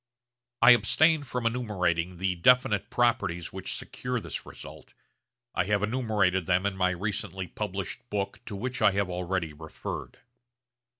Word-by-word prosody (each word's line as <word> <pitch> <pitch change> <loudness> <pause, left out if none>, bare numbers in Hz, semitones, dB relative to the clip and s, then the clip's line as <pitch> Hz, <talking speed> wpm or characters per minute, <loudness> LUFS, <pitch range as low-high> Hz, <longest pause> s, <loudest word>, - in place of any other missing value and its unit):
I 120 - +10
abstain 160 +6 +4
from 125 -1 -3
enumerating 95 -7 0
the 95 +1 0
definite 105 +2 +3
properties 100 -8 0
which - - -4
secure 125 -1 -3
this - - -7
result, - - -11 0.6
I - - +1
have 105 0 +1
enumerated 105 -7 +1
them 90 +1 +2
in 100 -1 0
my 90 -1 +2
recently 95 0 -3
published 85 - -5
book 100 -1 -2
to 105 - -5
which 130 +6 -4
I 100 - +5
have 100 -2 0
already 90 -2 -2
referred. 80 +1 -7
100 Hz, 140 wpm, -28 LUFS, 90-120 Hz, 0.6 s, I